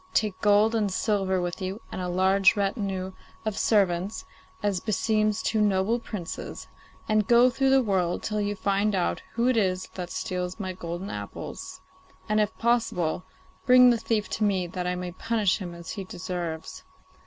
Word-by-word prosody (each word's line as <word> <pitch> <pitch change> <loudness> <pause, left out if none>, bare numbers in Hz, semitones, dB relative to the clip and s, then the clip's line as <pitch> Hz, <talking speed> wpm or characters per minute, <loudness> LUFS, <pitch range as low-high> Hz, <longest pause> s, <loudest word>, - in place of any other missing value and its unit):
Take 210 -4 +1
gold 210 +2 +4
and 210 -3 +1
silver 190 -2 +1
with 175 +1 -3
you, 190 +3 -3
and - - -4
a 180 - -2
large 190 +3 +4
retinue 195 -2 -1 0.3
of 215 -2 -1
servants, 195 - +1 0.4
as 200 -3 +1
beseems 215 0 +1
two 220 -1 +1
noble 205 +3 +2
princes, 205 -7 -6 0.4
and 215 -2 +2
go 240 +1 +6
through 270 +2 +1
the 265 -1 +5
world 185 -5 0
till 210 -1 -1
you 205 0 -1
find 200 +1 +1
out 180 - 0
who 235 +1 +1
it 255 -2 +3
is 185 -3 +1
that 180 -2 -5
steals 180 +1 -3
my 185 -2 -3
golden 175 +2 -5
apples, 100 -1 -7 0.5
and, 215 0 +2
if 210 0 0
possible, 225 -8 0 0.4
bring 250 0 +8
the 235 - +2
thief 220 -1 0
to 215 - -1
me 195 -3 +2
that 180 +1 -4
I 180 - 0
may 180 0 -4
punish 210 +1 0
him 175 -3 -6
as 170 -1 -8
he 200 - -5
deserves. 175 -3 -5
195 Hz, 175 wpm, -26 LUFS, 180-215 Hz, 0.5 s, bring